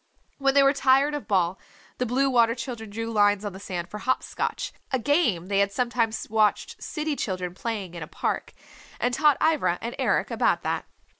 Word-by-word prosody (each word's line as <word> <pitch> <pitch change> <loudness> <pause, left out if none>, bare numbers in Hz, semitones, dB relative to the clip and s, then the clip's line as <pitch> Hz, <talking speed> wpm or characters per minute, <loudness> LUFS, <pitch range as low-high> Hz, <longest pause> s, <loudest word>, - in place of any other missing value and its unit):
When 275 0 +2
they 280 - +7
were 275 +1 +5
tired 275 +1 +3
of 295 - -4
ball, 185 -3 +1 0.4
the 250 - 0
Blue 265 +4 +2
Water 235 -3 +3
Children 235 -2 -6
drew 225 +2 -4
lines 205 -1 +3
on 205 - -4
the 190 - -9
sand 180 -3 -5
for 210 +4 -7
"hop 260 +4 0
scotch," - - -3 0.2
a 260 - +2
game 250 - +1
they 200 +1 0
had 200 0 +2
sometimes 235 0 -1
watched 215 -1 +1
city 305 -1 -3
children 185 -7 -3
playing 200 -3 -4
in 170 - -7
a 150 - -5
park, - - -3 0.5
and 245 0 0
taught 300 +1 +4
Ivra 310 - +2
and 235 +1 -5
Eric - - +1
about - - +1
that. - - -2
230 Hz, 200 wpm, -26 LUFS, 200-265 Hz, 0.5 s, they